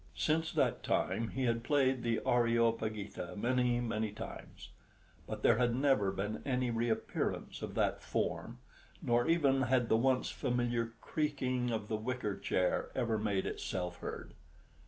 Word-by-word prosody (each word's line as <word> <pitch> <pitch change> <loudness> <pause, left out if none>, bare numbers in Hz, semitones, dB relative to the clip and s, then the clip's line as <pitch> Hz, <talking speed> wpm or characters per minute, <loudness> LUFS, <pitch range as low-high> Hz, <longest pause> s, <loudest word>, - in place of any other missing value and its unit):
Since 160 +1 +1
that - - +1
time 115 - 0
he 135 +3 -3
had 115 -1 +1
played 130 -2 +2
the 115 -1 0
"Areopagita" 115 -5 +1
many, 125 +2 +2
many 110 -3 -1
times; 110 +2 -9 0.6
but - - -5
there - - +5
had 120 -1 +2
never 130 -7 +3
been 105 +3 -3
any 125 -2 0
reappearance 115 -1 -2
of - - -5
that - - +1
form, - - -2 0.5
nor 120 0 +2
even 140 -5 +3
had 125 -1 +2
the 110 - +5
once 130 +2 +2
familiar 120 -1 -1
creaking 130 -5 -1
of 110 -3 -2
the 110 - -1
wicker 110 -2 -2
chair 90 -1 0
ever 115 -2 0
made 100 -3 0
itself 90 -1 -3
heard. - - -6
120 Hz, 145 wpm, -34 LUFS, 110-130 Hz, 0.6 s, there